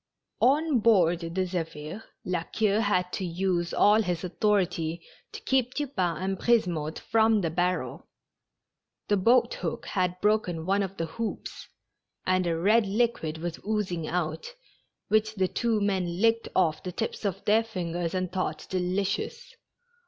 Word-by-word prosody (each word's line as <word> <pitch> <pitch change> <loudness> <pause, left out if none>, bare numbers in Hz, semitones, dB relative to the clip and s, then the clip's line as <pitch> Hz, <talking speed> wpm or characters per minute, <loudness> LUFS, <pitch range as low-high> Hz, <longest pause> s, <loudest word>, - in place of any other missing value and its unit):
On 290 +1 +3
board 185 -7 +4
the 165 -1 -5 0.2
Zephir^ 165 0 -5 0.2
La 180 -2 -1
Queue 210 +4 0
had 180 -4 +1
to - - -2
use 175 0 -1
all 210 +2 +5
his 180 -4 -2
authority 180 -4 0 0.3
to - - -7
keep 255 -2 +1
Tupain 200 - -1
and 190 +2 -2
Brisemotte 175 -10 +1
from 220 -1 +3
the 165 -3 -1
barrel. 180 +2 -1 1.0
The 205 - +4
boat 235 - +4
hook - - -3
had 180 -2 -1
broken 190 -6 +1
one 195 +2 +2
of 195 0 -4
the 165 - -1
hoops, 215 +8 -5 0.6
and 185 -1 +2
a 165 -1 0
red 210 +5 +3
liquid 200 -7 0
was 170 +1 -5
oozing 190 -7 -2
out, 170 - -3 0.5
which 215 0 +2
the 190 -2 +2
two 230 +2 0
men 185 -4 -1
licked 230 +1 +2
off 165 -4 +2
the 185 - -5
tips 225 +6 -4
of 200 -4 -3
their 220 +2 +4
fingers 175 -5 -3
and 185 -1 -1
thought 180 -4 -3
delicious. 195 - -2
185 Hz, 150 wpm, -27 LUFS, 175-215 Hz, 1.0 s, all